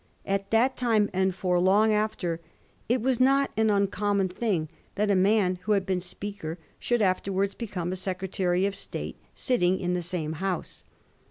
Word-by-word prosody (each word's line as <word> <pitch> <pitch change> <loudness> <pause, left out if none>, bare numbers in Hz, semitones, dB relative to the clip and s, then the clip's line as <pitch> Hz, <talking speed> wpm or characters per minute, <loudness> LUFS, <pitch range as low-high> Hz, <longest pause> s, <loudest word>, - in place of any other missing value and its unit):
At 195 0 -1
that 245 +4 +3
time, 225 -4 +2
and 190 0 +1
for 180 -2 +1
long 205 +4 +4
after, 190 -6 -1 0.5
it 245 0 +2
was 255 0 +1
not 275 +2 +4
an 220 0 +2
uncommon 200 -1 +1
thing 180 -5 -1 0.3
that 205 0 +1
a - - +4
man 190 -1 +3
who 215 - +1
had 195 -2 +1
been 185 -1 0
Speaker 180 -2 -6 0.2
should 240 -3 +1
afterwards 195 +1 0
become 190 -6 -4
a - - -2
Secretary 185 0 -1
of 200 - 0
State, - - -6 0.2
sitting 190 -8 +1
in 180 0 -1
the 180 - 0
same 165 -3 -3
House. 190 -3 -3
195 Hz, 170 wpm, -27 LUFS, 180-215 Hz, 0.5 s, long